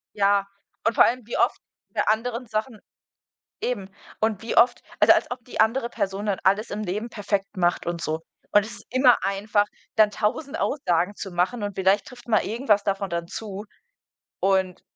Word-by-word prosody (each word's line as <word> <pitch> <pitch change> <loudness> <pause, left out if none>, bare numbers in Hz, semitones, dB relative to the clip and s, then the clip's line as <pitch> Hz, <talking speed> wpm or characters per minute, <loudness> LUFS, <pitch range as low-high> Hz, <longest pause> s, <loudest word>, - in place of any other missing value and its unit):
Ja, 200 0 +3 0.4
und 225 - +2
vor - - +8
allem 250 +2 0
wie 235 - -4
oft - - +2 0.3
bei - - +1
anderen 235 +3 0
Sachen 215 +1 -3 0.8
eben. 200 -6 -3 0.3
Und 220 -1 0
wie 230 - -3
oft 240 +1 +5 0.2
also, - - +8
als - - 0
ob 245 -2 -6
die 245 - -3
andere 235 +2 +2
Person 200 -2 -3
dann 195 -3 0
alles 200 +4 +2
im 210 +1 -3
Leben 210 +5 -3
perfekt 200 -3 -3
macht 175 -1 +1
und 170 -1 -2
so. 160 0 -2 0.3
Und 205 0 +5
es 215 - -8
ist 200 - -15
immer 255 -1 +5
einfach, 205 +1 +1 0.3
dann 215 -1 +6
1.000 270 +10 -2
Aussagen 180 - 0
zu 195 - -6
machen 185 +6 0
und 205 -1 -3
vielleicht 190 +2 +2
trifft 245 -1 -13
mal 220 - +3
irgendwas 220 -3 +2
davon 195 -1 -1
dann 170 0 -2
zu. 205 -1 -6 0.8
Und 190 -2 +1
210 Hz, 185 wpm, -25 LUFS, 195-230 Hz, 0.8 s, vor